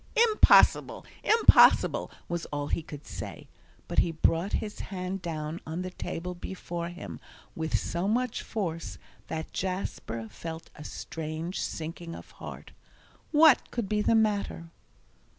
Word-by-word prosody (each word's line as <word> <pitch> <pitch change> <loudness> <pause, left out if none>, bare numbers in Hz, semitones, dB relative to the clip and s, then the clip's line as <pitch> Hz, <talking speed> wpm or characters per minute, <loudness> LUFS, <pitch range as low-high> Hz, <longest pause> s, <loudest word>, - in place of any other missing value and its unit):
"Impossible, - - +5 0.2
impossible!" 450 +1 +6 0.2
was 170 -1 -3
all 145 0 -3
he - - 0
could 150 -2 -10
say, - - -7 0.4
but - - +1
he - - +3
brought 165 +3 +1
his 210 -1 -2
hand 185 0 -4
down 160 -1 -4
on 165 +3 -4
the 185 - -5
table 180 0 -5
before 175 -1 -5
him 175 - -8 0.4
with 160 -1 0
so 175 +3 -2
much 245 +2 0
force 170 -6 -4 0.3
that 160 0 -5
Jasper 180 - -3
felt 160 +9 -8
a 150 - -9
strange 160 +3 -5
sinking 165 +1 -5
of - - -11
heart. - - -8 0.6
What 305 -2 +6
could 235 -4 -2
be 210 +1 +1
the 225 - +3
matter? 205 -6 0
170 Hz, 135 wpm, -29 LUFS, 160-195 Hz, 0.6 s, impossible